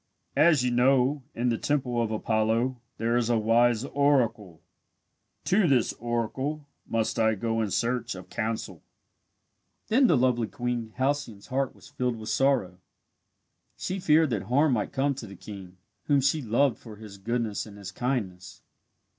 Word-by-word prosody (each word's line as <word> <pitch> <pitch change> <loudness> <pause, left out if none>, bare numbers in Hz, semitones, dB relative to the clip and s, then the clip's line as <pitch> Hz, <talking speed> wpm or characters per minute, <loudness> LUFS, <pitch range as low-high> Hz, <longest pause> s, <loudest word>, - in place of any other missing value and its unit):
As 155 -5 +5
you 125 - +1
know, 130 +3 +3
in 120 +1 0
the 115 - -1
Temple 130 -5 0
of 115 - 0
Apollo 110 +3 0 0.2
there 115 +1 0
is 120 -1 0
a 120 - +3
wise 115 +2 +3
oracle. 120 - +1 0.9
To 195 0 +3
this 130 -6 +2
oracle 125 +6 -2 0.2
must 115 0 -1
I 110 -1 +3
go 115 +2 -1
in 110 - -1
search 120 +1 -1
of 90 0 -10
counsel." 110 -6 -3 1.1
Then 255 +4 +5
the 160 - +4
lovely 120 -2 +2
Queen 120 -1 -3
Halcyone's 130 -6 -2
heart 135 0 -1
was - - -16
filled 125 -1 -2
with 110 -1 -7
sorrow. 125 -10 +1 1.0
She 190 +1 -3
feared 155 -4 +3
that 110 -4 0
harm 135 +6 +3
might 105 -3 -1
come 140 +1 +1
to 125 -4 -8
the 100 - -10
king, 95 -2 -10 0.3
whom 145 -1 +3
she 140 +3 +1
loved 120 +1 +1
for 110 -3 -11
his 105 -2 -11
goodness 115 0 -2
and 105 -1 -12
his 100 -2 -8
kindness. 95 -7 -4
120 Hz, 160 wpm, -27 LUFS, 110-135 Hz, 1.1 s, As